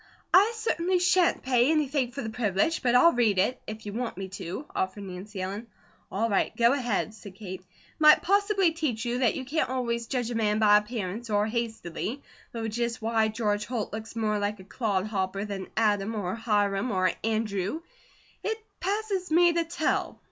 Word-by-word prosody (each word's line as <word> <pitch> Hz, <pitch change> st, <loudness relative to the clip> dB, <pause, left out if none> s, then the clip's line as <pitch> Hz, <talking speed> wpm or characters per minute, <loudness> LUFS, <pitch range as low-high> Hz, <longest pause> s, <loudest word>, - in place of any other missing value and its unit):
"I 410 Hz, +5 st, +6 dB
certainly 375 Hz, -5 st, 0 dB
shan't 355 Hz, 0 st, +3 dB
pay 250 Hz, 0 st, +3 dB
anything 285 Hz, -5 st, +1 dB
for 275 Hz, 0 st, -5 dB
the 220 Hz, -, -4 dB
privilege, 220 Hz, -, 0 dB
but 245 Hz, -2 st, +2 dB
I'll 335 Hz, +7 st, +7 dB
read 225 Hz, -5 st, +2 dB
it, 205 Hz, +7 st, +1 dB
if 215 Hz, 0 st, -7 dB
you 205 Hz, -, -5 dB
want 240 Hz, -2 st, -3 dB
me 190 Hz, 0 st, -5 dB
to," 185 Hz, -, -6 dB
offered 190 Hz, +2 st, -2 dB
Nancy 190 Hz, +2 st, -8 dB
Ellen. 200 Hz, +5 st, -5 dB, 0.4 s
"All 220 Hz, +4 st, 0 dB
right, 200 Hz, -3 st, 0 dB
go 235 Hz, +2 st, +5 dB
ahead," 240 Hz, -6 st, -1 dB
said 200 Hz, -3 st, -12 dB
Kate. 190 Hz, -2 st, -7 dB
"It 185 Hz, -, -33 dB, 0.3 s
might 305 Hz, -1 st, +7 dB
possibly 400 Hz, -2 st, +3 dB
teach 290 Hz, -9 st, -2 dB
you 240 Hz, +1 st, -1 dB
that 245 Hz, -4 st, +2 dB
you 260 Hz, -, -4 dB
can't 305 Hz, +2 st, 0 dB
always 235 Hz, -2 st, -2 dB
judge 245 Hz, -2 st, -2 dB
a -, -, -3 dB
man 210 Hz, -2 st, +1 dB
by 210 Hz, -1 st, +6 dB
appearance, 210 Hz, 0 st, -4 dB
or 205 Hz, 0 st, +2 dB
hastily; 225 Hz, -, -3 dB, 0.3 s
though 225 Hz, -1 st, -3 dB
just 235 Hz, +2 st, -2 dB
why 225 Hz, 0 st, +1 dB
George 210 Hz, -1 st, -1 dB
Holt 230 Hz, -5 st, -3 dB
looks 220 Hz, +1 st, -6 dB
more 215 Hz, -2 st, 0 dB
like 205 Hz, 0 st, -2 dB
a -, -, -10 dB
'clod 200 Hz, -1 st, -1 dB
hopper' 195 Hz, -1 st, -2 dB
than 195 Hz, -2 st, -5 dB
Adam, 210 Hz, 0 st, +1 dB
or 190 Hz, -3 st, -2 dB
Hiram, 210 Hz, -1 st, 0 dB
or 185 Hz, -3 st, +2 dB
Andrew, 215 Hz, -, -1 dB, 0.6 s
it 440 Hz, +1 st, -1 dB, 0.2 s
passes 395 Hz, -1 st, -2 dB
me 345 Hz, +2 st, +5 dB
to 335 Hz, 0 st, +1 dB
tell." 325 Hz, -1 st, -1 dB
225 Hz, 190 wpm, -27 LUFS, 205-265 Hz, 0.6 s, I'll